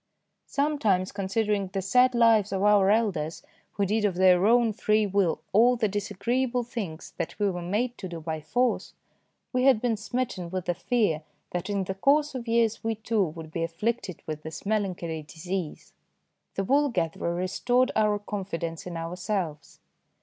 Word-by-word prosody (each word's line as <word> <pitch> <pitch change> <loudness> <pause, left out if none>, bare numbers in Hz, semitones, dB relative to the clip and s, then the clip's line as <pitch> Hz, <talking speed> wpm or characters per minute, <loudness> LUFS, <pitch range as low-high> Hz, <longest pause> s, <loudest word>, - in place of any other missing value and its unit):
Sometimes, 225 -11 +1
considering 200 0 0
the 195 +1 -3
sad 250 +6 +4
lives 225 -4 +4
of 195 0 -1
our 205 -2 +5
elders 195 -8 0 0.3
who 200 - 0
did 210 +3 0
of 200 -4 +1
their 185 +1 +5
own 235 -1 +4
free 215 +1 +2
will 195 -4 +1
all 240 +5 +6
the 230 -3 +1
disagreeable 240 +5 -1
things 210 -10 -6
that - - -4
we 205 -2 +1
were 175 -1 -5
made 220 +8 -1
to 190 - -5
do 170 -1 -6
by 160 -1 -4
force, 245 +9 0 0.6
we 255 0 +2
had 265 -5 +6
been 235 -1 +1
smitten 210 -5 -3
with 185 0 -3
the 175 - +1
fear 185 -4 0 0.3
that 175 +3 -3
in 200 -1 0
the 190 - -3
course 285 +9 +2
of 250 -2 -6
years 230 -1 +1
we, 225 0 0
too, 220 -1 0
would 160 -1 -8
be 165 - -3
afflicted 195 +3 -3
with 155 -1 -5
this 160 +3 -8
melancholy 185 -6 -1
disease. 165 +2 -6 0.6
The 195 - 0
wool 285 +7 +3
gatherer 170 -5 -1
restored 245 +8 +1
our 210 -1 +3
confidence 180 -5 -5
in 170 -2 -5
ourselves. 165 -3 -4
200 Hz, 170 wpm, -27 LUFS, 175-230 Hz, 0.6 s, all